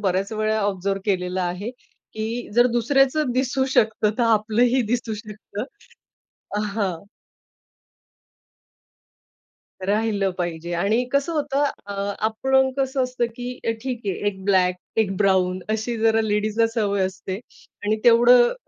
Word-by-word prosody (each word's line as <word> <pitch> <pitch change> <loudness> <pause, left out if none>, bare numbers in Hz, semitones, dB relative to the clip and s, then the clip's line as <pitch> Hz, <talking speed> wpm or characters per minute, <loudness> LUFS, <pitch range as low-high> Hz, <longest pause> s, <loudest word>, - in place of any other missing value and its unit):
बऱ्याच 195 +1 0
वेळा 215 0 0
ऑब्झर्व्ह 195 -1 -1
केलेलं 185 -2 -1
आहे, 180 +6 -3
की 230 -1 -7
जर 240 +1 +6
दुसऱ्याचं 270 +4 +2
दिसू 260 +1 +1
शकतं, 215 -1 +3
तर - - +3
आपलंही 230 +3 +3
दिसू 235 -3 -1
शकतं. 210 0 -7 1.1
हां. 190 -6 -2 2.8
राहिलं 205 -2 +1
पाहिजे 170 -1 -3
आणि 210 +8 +1
कसं 280 +4 +1
होतं 290 -2 0 0.2
अ, 200 - -5 0.3
आपण 265 +4 +2
कसं 265 -1 +1
असतं, 250 -1 -1
की 245 +1 -6
अ, - - +3
ठीक 250 -3 -4
आहे 195 -2 -1
एक 190 -2 -3
ब्लॅक 185 -2 +3 0.2
एक 195 -3 +1
ब्राउन 185 -2 +2
अशी 220 +2 -1
जरा 225 0 +3
लेडीजला 215 +1 +1
सवय 205 -4 0
असते 185 0 -5 0.5
आणि 215 +1 +2
तेवढं 240 +1 +6
220 Hz, 125 wpm, -23 LUFS, 195-245 Hz, 2.8 s, जर